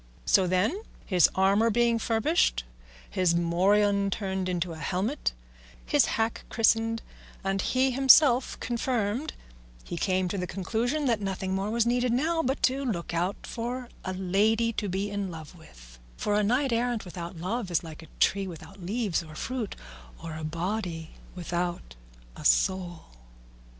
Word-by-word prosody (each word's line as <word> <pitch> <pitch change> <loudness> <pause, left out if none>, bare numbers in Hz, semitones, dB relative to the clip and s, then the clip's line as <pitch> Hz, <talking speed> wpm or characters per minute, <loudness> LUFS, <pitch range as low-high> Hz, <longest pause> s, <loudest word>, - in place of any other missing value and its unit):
So 190 -2 +4
then, 195 - +1 0.2
his 180 -4 +4
armour 200 +4 +4
being 235 +1 +2
furbished, 225 - +1 0.4
his 180 -2 +1
morion 200 +4 +3
turned 190 -2 -2
into 175 -1 -1
a 160 - -9
helmet, 190 - -1 0.5
his - - +4
hack 225 0 -1
christened, 225 0 +2 0.4
and 195 0 0
he 260 +4 +2
himself 265 0 +5
confirmed, 240 +2 -1 0.5
he 175 - -6
came 185 +1 +1
to 200 - -2
the 180 - -2
conclusion 235 - -1
that 230 -5 +1
nothing 190 -1 -2
more 195 +2 -1
was 230 +1 +2
needed 245 +1 +1
now 320 +7 +1
but 270 -2 -2
to 265 +2 +2
look 180 -9 -3
out 175 +4 -1
for 245 +1 -4
a 185 - -3
lady 210 +5 +2
to 210 -2 -2
be 195 +3 -2
in 200 -2 -2
love 160 -2 -9
with; - - -16 0.2
for 210 - -1
a 210 - +3
knight 250 +4 +2
errant 235 -2 0
without 175 0 -7
love 190 +5 -3
was 175 -1 +1
like 160 -1 -9
a 160 - -13
tree 195 0 +2
without 175 +2 -10
leaves 200 0 -1
or 155 -2 -11
fruit, 250 +2 -4 0.4
or 165 -1 -7
a 160 - -6
body 170 0 -3 0.2
without 175 - -3 0.4
a - - -10
soul. 175 - +1
200 Hz, 155 wpm, -28 LUFS, 175-235 Hz, 0.5 s, himself